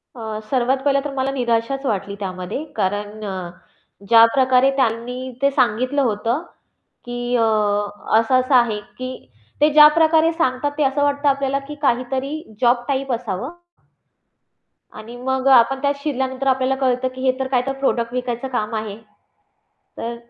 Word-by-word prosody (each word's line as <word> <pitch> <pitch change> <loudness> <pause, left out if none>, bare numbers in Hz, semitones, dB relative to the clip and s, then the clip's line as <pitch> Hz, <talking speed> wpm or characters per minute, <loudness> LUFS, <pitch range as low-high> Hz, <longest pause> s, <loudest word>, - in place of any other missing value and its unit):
अ, 220 -2 -5
सर्वात 260 0 +1
पहिलं 275 -1 +3
तर 285 - -3
मला 270 0 -1
निराशाच 245 +1 -1
वाटली 200 -3 -2
त्यामध्ये. 185 +7 -5
कारण 205 +2 -2
अ, 185 -3 -5 0.6
ज्या 230 -1 +8
प्रकारे 260 0 +4
त्यांनी 245 -1 -1 0.2
ते 280 - +4
सांगितलं 255 +3 +1
होतं, 230 +3 0 0.6
की 245 0 -3
अ, 230 - +3 0.8
असं-असं 255 +3 +2
आहे, 235 -4 +3 0.2
की 255 0 -7 0.3
ते 300 - +6
ज्या 300 0 +9
प्रकारे 320 0 +4
सांगतात 290 -3 0
ते 300 - +2
असं 275 +2 +1
वाटतं 285 0 +1
आपल्याला, 275 0 0
की 295 - -7
काहीतरी 260 +2 -1 0.3
जॉब 240 0 +3
टाइप 275 -1 -1
असावं 230 - -4 1.5
आणि 230 +3 -10
मग 265 +1 -1
अ, - - +6
आपण 265 +2 +4
त्यात 280 0 +1
शिरल्यानंतर 265 -2 -2
आपल्याला 265 0 +2
कळतं, 250 0 +1
की 260 - -7
हे 260 -1 +1
तर 265 - -1
काय 255 -2 +1
तर 270 - -1
प्रॉडक्ट 240 -3 0
विकायचं 250 0 -3
काम 215 +1 -3
आहे. 215 -1 -4 1.0
तर 235 +1 -4
255 Hz, 155 wpm, -20 LUFS, 230-275 Hz, 1.5 s, ज्या